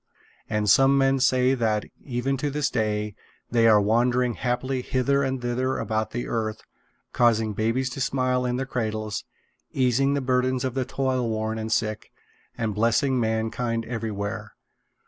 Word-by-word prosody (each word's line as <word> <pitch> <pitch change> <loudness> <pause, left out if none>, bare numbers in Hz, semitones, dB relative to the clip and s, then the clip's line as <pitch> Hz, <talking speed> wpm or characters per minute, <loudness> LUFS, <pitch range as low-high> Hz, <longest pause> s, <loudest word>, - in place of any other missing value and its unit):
And 105 -1 0
some 135 +7 +5
men 135 0 +3
say 130 0 +3
that, 110 -4 0 0.2
even 130 +1 -1
to 145 +3 -1
this 145 0 -1
day, 105 -3 -1 0.4
they 115 -1 +4
are 110 -2 +6
wandering 120 +4 +2
happily 125 +3 -2
hither 135 +2 +1
and 135 -1 -1
thither 125 +2 -1
about 110 -1 -1
the 120 +1 -4
earth, 110 -2 -3 0.5
causing 115 -3 +3
babies 115 +5 0
to 135 - -5
smile 130 -1 +1
in 125 0 -1
their 135 +1 -2
cradles, 110 -4 -3 0.5
easing 135 +2 +2
the - - +1
burdens 130 0 +1
of 130 - -2
the 130 -1 -1
toilworn 115 -5 -1
and 110 0 -4
sick, 110 -1 -1 0.5
and 115 -3 -1
blessing 115 +5 +2
mankind 115 +1 -1
everywhere. 110 -2 -4
120 Hz, 150 wpm, -25 LUFS, 110-130 Hz, 0.5 s, are